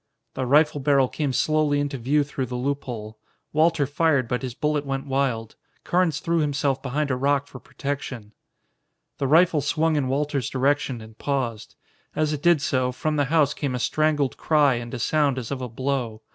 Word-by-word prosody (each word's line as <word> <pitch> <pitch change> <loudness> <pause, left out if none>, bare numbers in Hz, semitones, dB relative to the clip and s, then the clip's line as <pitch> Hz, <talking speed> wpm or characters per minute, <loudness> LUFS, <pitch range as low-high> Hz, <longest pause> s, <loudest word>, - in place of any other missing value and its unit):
The 130 -1 -3
rifle 150 +2 +4
barrel 135 -1 +3
came 145 +1 -2
slowly 150 +1 +1
into 145 -2 -2
view 145 +5 +2
through 140 -2 -4
the 125 - -5
loophole. 125 -5 -4 0.3
Walter 160 -1 +3
fired, 145 -2 +1
but 125 +2 -2
his 125 -3 -5
bullet 150 0 0
went 135 -1 -3
wild. 130 -5 -1 0.3
Carnes 175 -4 +1
threw 170 0 0
himself 140 -3 0
behind 140 +2 -1
a - - +1
rock 140 +2 +1
for 130 - -11
protection. 130 -8 -5 0.9
The 135 - 0
rifle 165 +1 +4
swung 155 +2 +1
in 140 -3 0
Walter's 140 -1 -1
direction 135 -2 0
and 110 0 -14
paused. 125 -6 -3 0.4
As 155 0 +1
it 145 - -4
did 170 -3 +4
so, 130 -1 +1
from 155 +4 -2
the 145 - +2
house 150 -1 +2
came 140 -4 -3
a - - -2
strangled 150 -2 +1
cry 150 -4 +3
and 120 -1 -5
a 130 - -4
sound 140 +3 +1
as 125 -1 -5
of 135 -2 -3
a 125 - -4
blow. 120 -3 -3
140 Hz, 185 wpm, -24 LUFS, 130-150 Hz, 0.9 s, rifle